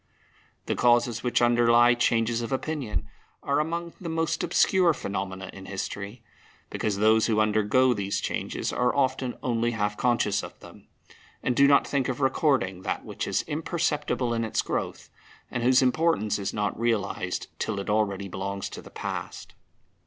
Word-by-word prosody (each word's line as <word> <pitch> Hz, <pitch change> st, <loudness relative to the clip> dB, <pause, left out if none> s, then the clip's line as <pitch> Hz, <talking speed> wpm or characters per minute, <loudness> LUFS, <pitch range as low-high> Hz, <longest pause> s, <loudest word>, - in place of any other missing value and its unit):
The -, -, -1 dB
causes 120 Hz, -1 st, +3 dB
which 120 Hz, -1 st, +1 dB
underlie 120 Hz, 0 st, +5 dB
changes 120 Hz, -1 st, +1 dB
of 115 Hz, -, -5 dB
opinion 130 Hz, -, -3 dB, 0.4 s
are 140 Hz, +1 st, +1 dB
among 170 Hz, +2 st, -2 dB
the 170 Hz, -, -4 dB
most 165 Hz, 0 st, -1 dB
obscure 175 Hz, -1 st, +3 dB
phenomena 95 Hz, -3 st, -5 dB
in 95 Hz, -1 st, -10 dB
history, 100 Hz, +3 st, -5 dB, 0.5 s
because 105 Hz, -2 st, -1 dB
those 110 Hz, +2 st, +4 dB
who 110 Hz, -2 st, +2 dB
undergo, 110 Hz, +4 st, +3 dB
these 100 Hz, -2 st, -2 dB
changes -, -, -3 dB
are 125 Hz, 0 st, +1 dB
often 130 Hz, -2 st, 0 dB
only 120 Hz, -1 st, 0 dB
half 105 Hz, -1 st, -1 dB
conscious 120 Hz, -5 st, +1 dB
of -, -, -10 dB
them, -, -, -15 dB, 0.6 s
and 125 Hz, -, 0 dB
do 140 Hz, +2 st, +6 dB
not 140 Hz, -1 st, +5 dB
think 140 Hz, -3 st, 0 dB
of 130 Hz, -, -3 dB
recording 130 Hz, -, +1 dB
that -, -, -3 dB
which -, -, -4 dB
is -, -, 0 dB
imperceptible 150 Hz, -5 st, -1 dB
in 115 Hz, 0 st, -1 dB
its 110 Hz, -, -1 dB
growth, -, -, -4 dB, 0.4 s
and 125 Hz, -, -2 dB
whose 125 Hz, +2 st, +4 dB
importance 130 Hz, -6 st, +1 dB
is 100 Hz, -, -2 dB
not 105 Hz, 0 st, -2 dB
realized 115 Hz, -3 st, -1 dB
till 105 Hz, -3 st, -2 dB
it 100 Hz, -, -5 dB
already 100 Hz, -2 st, 0 dB
belongs 100 Hz, +1 st, -4 dB
to -, -, -8 dB
the -, -, -13 dB
past. -, -, -6 dB
120 Hz, 160 wpm, -26 LUFS, 105-130 Hz, 0.6 s, do